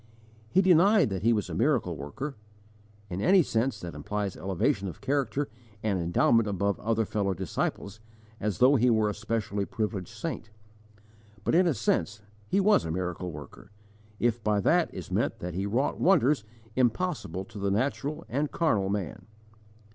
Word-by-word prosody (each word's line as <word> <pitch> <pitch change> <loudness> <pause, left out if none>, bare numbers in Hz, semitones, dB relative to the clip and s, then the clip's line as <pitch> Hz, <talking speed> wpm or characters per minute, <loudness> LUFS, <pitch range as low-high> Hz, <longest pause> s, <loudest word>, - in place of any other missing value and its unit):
He 190 +8 +3
denied 185 - +5
that 95 -2 -2
he 115 +4 +3
was 105 -4 0
a - - -6
miracle - - +1
worker, 135 - -6 0.7
in 95 0 -4
any 185 - +5
sense 115 -2 -1
that 85 -1 -6
implies 100 +6 -3
elevation 95 +2 0
of 90 - -7
character 140 +1 -1 0.4
and 100 -4 0
endowment 95 +6 +3
above 100 0 0
other 115 0 0
fellow 100 -2 -1
disciples, 95 +3 -3 0.4
as 105 -2 -2
though 135 +3 +5
he 125 +1 +3
were 110 -2 +3
a - - -5
specially 105 -2 -2
privileged 105 -3 -4
saint; 110 - -5 0.9
but - - 0
in 180 +1 +5
a 160 - +1
sense 105 -1 -1 0.2
he 195 - +2
was 205 - +4
a 80 - -4
miracle 90 +1 -3
worker, 75 +4 -11 0.5
if 120 -1 0
by 105 -1 +2
that 100 - +2
is - - -8
meant - - 0
that 90 0 -5
he 95 +3 -2
wrought 120 +7 0
wonders 150 - +3 0.3
impossible 120 - 0
to 105 - -10
the 100 0 0
natural 140 +8 -1
and 145 +4 -1
carnal 105 - +1
man. 100 -1 -4
105 Hz, 165 wpm, -28 LUFS, 95-135 Hz, 0.9 s, denied